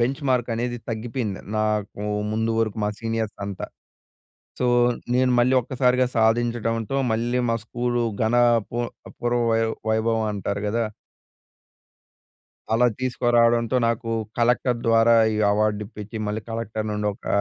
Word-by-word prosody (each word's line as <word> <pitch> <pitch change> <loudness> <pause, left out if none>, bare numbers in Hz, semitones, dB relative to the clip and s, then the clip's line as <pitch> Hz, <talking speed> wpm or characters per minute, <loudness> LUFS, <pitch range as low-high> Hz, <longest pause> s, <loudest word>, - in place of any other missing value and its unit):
Benchmark 130 -1 0
అనేది 120 +1 -2
తగ్గిపోయింది. 115 -2 -3 0.2
నాకు, 105 -1 -1 0.3
ముందు 110 +1 0
వరకు 110 -1 -1
మా 105 - 0
సీనియర్స్ 115 -2 -2
అంతా. 100 -1 -5 0.9
సో, 125 - +1 0.5
నేను, 130 0 +3
మళ్ళీ 125 +2 +3
ఒక్కసారిగా 125 0 +2
సాధించడంతో, 115 +2 +1
మళ్ళీ, 120 +3 0
మా 115 - +2
స్కూలు, 120 0 -1 0.2
ఘన 110 +2 +1 0.3
పూ 120 - -5 0.4
పూర్వ 120 0 +1
వై 115 0 +2 0.3
వైభవమంటారు 110 -2 0
కదా... 115 +2 0 1.9
అలా 120 +2 +4
తీసుకురావడంతో, 120 -1 +2
నాకు 115 0 -2 0.3
కలెక్టర్ 120 +1 +2
ద్వారా 115 +1 +5 0.2
ఈ - - -1 0.2
అవార్డు 105 0 +1
ఇప్పించి 105 +2 -8
మళ్ళీ 105 +1 -2
కలెక్టర్ 110 -1 -3
నుండి 105 0 -2
ఒక - - -18
115 Hz, 120 wpm, -24 LUFS, 110-120 Hz, 1.9 s, ద్వారా